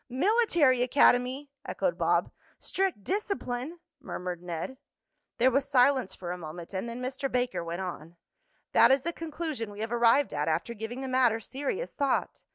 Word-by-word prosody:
"Military 315 - +3
academy!" 255 +2 +3
echoed - - -1
Bob. - - +2 0.3
"Strict 380 - -1
discipline!" 340 - -3 0.2
murmured 180 -9 -5
Ned. 175 +9 -5 0.6
There 255 +2 +4
was 275 +2 +1
silence 260 -4 +3
for 175 -1 -6
a 180 - -5
moment, 170 +3 -8
and 190 +5 -3
then 240 +2 -6
Mr. 265 +1 -3
Baker 250 -7 0
went 170 +2 -4
on: 170 -2 -6 0.6
"That - - +6
is 270 0 +4
the 340 - -2
conclusion 315 -8 -4
we 205 +1 -8
have 225 +1 -3
arrived 240 +4 +4
at 150 0 -1
after 165 +9 -1
giving 230 +4 -6
the 265 - -4
matter 255 -3 +3
serious 285 - -4
thought. 280 -1 -1
250 Hz, 165 wpm, -29 LUFS, 205-280 Hz, 0.6 s, That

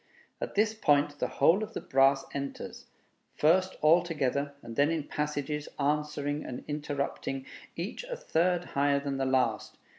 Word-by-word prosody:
At - - -4
this 215 +1 +3
point 145 -7 +2
the - - +1
whole 185 +6 +3
of 215 +1 -5
the - - -1
brass 135 +1 +3
enters, 140 -1 -6 0.5
first 185 +5 +3
all 155 +3 +6
together, 140 -4 -1
and 115 - -8
then 145 +4 +4
in 165 -2 -1
passages, 150 0 -3
answering 150 0 -1
and 125 - -6
interrupting, 140 -2 -3 0.3
each 180 - -4
a - - -4
third 175 - +1
higher 140 0 +3
than 140 -1 -3
the 135 - 0
last. 130 -1 0
145 Hz, 155 wpm, -30 LUFS, 140-165 Hz, 0.5 s, all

